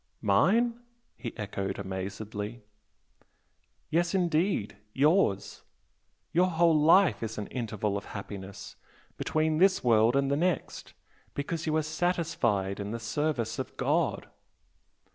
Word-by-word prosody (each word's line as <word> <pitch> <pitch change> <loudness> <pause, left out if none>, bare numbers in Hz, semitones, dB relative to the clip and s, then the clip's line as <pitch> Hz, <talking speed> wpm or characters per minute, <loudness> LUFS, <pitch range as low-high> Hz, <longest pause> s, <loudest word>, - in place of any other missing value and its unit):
"Mine?" 215 - +3 0.4
he 120 - -6
echoed 100 -2 -3
amazedly. 105 +4 -5 1.3
"Yes, 170 +3 +1
indeed! 170 - +1 0.2
yours! 145 - +2 0.7
Your 180 +2 +4
whole 165 -2 +3
life 165 +4 +5
is 110 -1 -4
an 105 - -3
interval 105 -4 -2
of 100 - -7
happiness 100 -1 -8 0.4
between 155 0 0
this 190 +1 +4
world 115 0 +4
and 140 0 +2
the - - +3
next, 175 +3 -2 0.4
because 160 +3 -3
you 155 - +1
are 155 - +1
satisfied 155 - 0
in 100 0 -4
the 115 +2 -4
service 120 -1 -2
of 130 - -6
God!" - - 0
135 Hz, 120 wpm, -29 LUFS, 105-165 Hz, 1.3 s, life